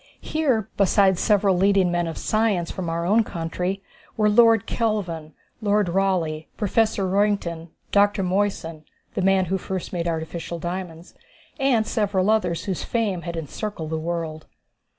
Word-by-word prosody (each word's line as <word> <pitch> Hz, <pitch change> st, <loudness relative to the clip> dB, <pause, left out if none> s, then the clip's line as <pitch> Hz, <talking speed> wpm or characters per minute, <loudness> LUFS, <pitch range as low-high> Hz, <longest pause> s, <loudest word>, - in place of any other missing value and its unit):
Here, 260 Hz, -9 st, 0 dB
besides 195 Hz, -1 st, +4 dB
several 200 Hz, -2 st, +3 dB
leading 190 Hz, -1 st, +3 dB
men 175 Hz, -1 st, 0 dB
of 165 Hz, -, -5 dB
science 215 Hz, -6 st, 0 dB
from 180 Hz, -3 st, -4 dB
our 170 Hz, +1 st, -2 dB
own 215 Hz, +5 st, +4 dB
country, 180 Hz, +2 st, -3 dB, 0.3 s
were 210 Hz, -1 st, +3 dB
Lord 225 Hz, 0 st, +5 dB
Kelvin, 180 Hz, -11 st, -2 dB, 0.3 s
Lord 205 Hz, -2 st, +2 dB
Rayleigh, 170 Hz, -4 st, 0 dB
Professor 210 Hz, -1 st, +1 dB
Roentgen, 185 Hz, -4 st, 0 dB, 0.2 s
Dr. 205 Hz, 0 st, +3 dB
Moissan 180 Hz, -4 st, -1 dB, 0.3 s
the -, -, -1 dB
man 190 Hz, 0 st, +3 dB
who 190 Hz, +2 st, -1 dB
first 190 Hz, 0 st, -5 dB
made 170 Hz, -1 st, -2 dB
artificial 165 Hz, +1 st, -4 dB
diamonds 175 Hz, 0 st, -6 dB, 0.5 s
and 255 Hz, -5 st, +3 dB
several 205 Hz, -2 st, +1 dB
others 180 Hz, -6 st, 0 dB
whose 190 Hz, -4 st, -2 dB
fame 210 Hz, -7 st, -1 dB
had 170 Hz, -1 st, -5 dB
encircled 165 Hz, +1 st, -5 dB
the 160 Hz, -, -1 dB
world. 160 Hz, -1 st, -4 dB
190 Hz, 145 wpm, -23 LUFS, 170-210 Hz, 0.5 s, Lord